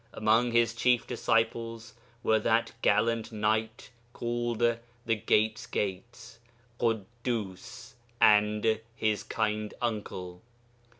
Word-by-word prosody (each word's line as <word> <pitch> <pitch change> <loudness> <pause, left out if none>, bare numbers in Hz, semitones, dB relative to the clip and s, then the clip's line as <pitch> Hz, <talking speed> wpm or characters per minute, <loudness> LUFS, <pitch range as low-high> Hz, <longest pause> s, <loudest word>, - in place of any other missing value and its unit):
Among 115 +3 +2
his 115 -1 +3
chief 120 +1 +2
disciples 115 -1 -1 0.3
were 110 0 +3
that 115 +1 +1
gallant 115 +2 +2
knight 110 +2 -1 0.2
called 120 0 -2 0.5
the 115 - +2
'Gate's 110 +1 +1
Gate,' 115 +4 -5 0.4
Ḳuddus, 115 -2 -3 0.3
and 105 +1 +4
his 110 -2 0
kind 105 -1 -2
uncle. 95 -6 -4
110 Hz, 95 wpm, -29 LUFS, 105-115 Hz, 0.5 s, and